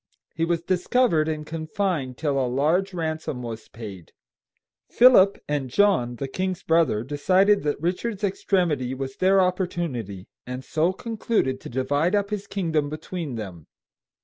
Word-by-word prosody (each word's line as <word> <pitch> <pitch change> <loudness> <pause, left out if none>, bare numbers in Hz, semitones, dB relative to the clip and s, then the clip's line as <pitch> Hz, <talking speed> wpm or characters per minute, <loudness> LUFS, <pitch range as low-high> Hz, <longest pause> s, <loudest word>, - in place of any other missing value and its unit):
He 165 - 0
was 170 -1 -1
discovered 180 -2 +2
and 155 -1 -3
confined 160 -4 -2
till 145 -3 0
a 125 - -1
large 160 +10 +1
ransom 160 -7 -3
was 115 -2 -7
paid. 100 -7 -10 0.8
Philip 235 -6 +6
and 145 -3 -2
John, 125 -7 +2
the 135 +3 -4
king's 185 +5 -3
brother, 160 -10 +2
decided 185 +9 +3
that 145 -1 -1
Richard's 190 +6 -2
extremity 170 -10 0
was 135 0 -5
their 190 +1 +4
opportunity, 170 - -2 0.2
and 125 +1 -6
so 160 +3 +1
concluded 210 - -1
to - - -8
divide 145 - +1
up 200 0 0
his 205 -1 -3
kingdom 160 -7 -1
between 155 -2 -5
them. 95 -8 -7
160 Hz, 145 wpm, -24 LUFS, 130-185 Hz, 0.8 s, Philip